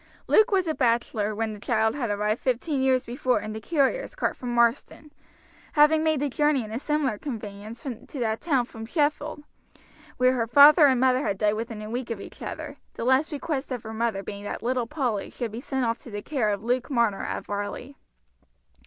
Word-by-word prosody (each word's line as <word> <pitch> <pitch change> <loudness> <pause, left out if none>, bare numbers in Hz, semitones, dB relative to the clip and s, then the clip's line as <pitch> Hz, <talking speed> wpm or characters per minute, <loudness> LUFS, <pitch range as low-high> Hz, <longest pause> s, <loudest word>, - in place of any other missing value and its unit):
Luke 435 - +5
was 385 -3 +2
a 315 - +1
bachelor 230 -5 0
when 220 0 -2
the 210 - -9
child 220 0 +1
had 250 -6 -2
arrived 210 +2 0
fifteen 265 +3 0
years 260 -1 +2
before 250 -1 0
in 215 +1 -6
the 220 - -6
carrier's 315 - 0
cart - - -1
from 250 - -6
Marsden, 240 +5 +1 0.6
having 310 +1 +5
made 315 -3 +1
the 290 - +1
journey 295 -1 +1
in 215 - -9
a 225 - -3
similar 285 -7 -1
conveyance 215 -3 -7
to 260 +1 -7
that 220 -2 -1
town 275 -7 +1
from 225 -2 -9
Sheffield, 295 +1 -1 0.7
where 255 0 +4
her 235 -3 0
father 290 +5 +8
and 260 -2 +3
mother 255 0 +3
had 195 - -1
died 210 +1 +2
within 220 -1 -5
a 215 - -7
week 245 0 -3
of 230 -3 -3
each - - -11
other, - - -6 0.2
the - - -4
last 265 +6 +3
request 290 -2 -3
of 245 -3 -4
her 220 0 -7
mother 220 -3 -1
being 200 0 -7
that 205 - -5
little 245 -1 0
Polly 245 -8 -2
should 235 -3 -5
be 230 +3 -6
sent 265 -2 -1
off 230 0 -1
to - - -12
the 205 -1 -6
care 260 -8 0
of 205 0 -2
Luke 245 +1 0
Marner 235 -7 +1
at - - -4
Varley. 205 +7 -5
245 Hz, 210 wpm, -26 LUFS, 220-280 Hz, 0.7 s, father